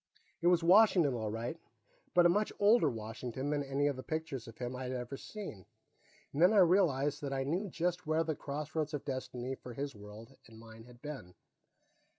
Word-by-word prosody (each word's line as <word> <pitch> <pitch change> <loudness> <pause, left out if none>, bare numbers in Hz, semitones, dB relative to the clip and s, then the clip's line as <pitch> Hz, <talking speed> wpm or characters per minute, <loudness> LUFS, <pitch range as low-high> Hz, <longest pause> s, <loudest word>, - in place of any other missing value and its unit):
It 170 - +2
was 175 -1 +4
Washington, 180 - +6
all 110 -3 -2
right, 115 +9 -4 0.6
but 175 -1 +6
a - - +9
much 205 +5 +1
older 205 -5 +5
Washington 120 +4 -4
than 145 -1 0
any 140 +1 0
of 145 -1 +1
the 130 - -6
pictures 155 -5 -4
of 115 - -11
him 125 0 -4
I 125 - -6
had 125 - -3
ever 125 +1 -4
seen. 160 - -8 0.7
Then 175 +8 +5
I - - +4
realized 155 -6 +3
that 140 -2 -3
I 135 0 0
knew 180 +9 -1
just 175 +1 -2
where 155 +1 +2
the 160 -1 -1
Crossroads 150 +2 -3
of 145 - -6
Destiny 130 -1 -4
for 125 -2 -9
his 140 +1 -4
world 105 +2 -12
and 110 -1 -15
mine 115 0 -13
had 120 0 -17
been. 135 -12 -7
140 Hz, 195 wpm, -33 LUFS, 125-165 Hz, 0.7 s, a